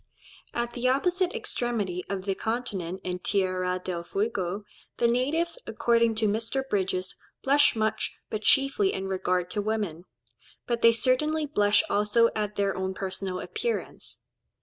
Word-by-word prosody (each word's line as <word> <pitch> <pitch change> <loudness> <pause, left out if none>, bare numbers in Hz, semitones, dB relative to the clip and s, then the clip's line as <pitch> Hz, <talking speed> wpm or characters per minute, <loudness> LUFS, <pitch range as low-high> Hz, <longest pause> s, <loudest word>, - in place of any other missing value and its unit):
At 235 0 -2
the 250 +1 +1
opposite 360 - +1
extremity 240 - -1
of 195 -1 -3
the 195 - +1
continent 195 -4 -3
in 180 0 -3
Tierra 185 -1 0
del 175 -2 -3
Fuego, 195 +1 -2 0.3
the 235 - +3
natives, 300 - +1
according 230 -1 +2
to 215 0 +1
Mr. 230 +6 0
Bridges, 190 -3 -1 0.3
"blush 285 0 +5
much, 220 0 -1
but 215 - -2
chiefly 275 - +4
in 190 - -3
regard 185 -1 -1
to 210 - -1
women; 205 -6 -2 0.6
but 235 -1 -1
they 230 - +8
certainly 300 +7 +2
blush 210 -7 +3
also 210 +3 +3
at 210 -1 -2
their 200 -1 0
own 190 0 -2
personal 190 -1 -3
appearance." 470 - -4
215 Hz, 145 wpm, -27 LUFS, 190-250 Hz, 0.6 s, they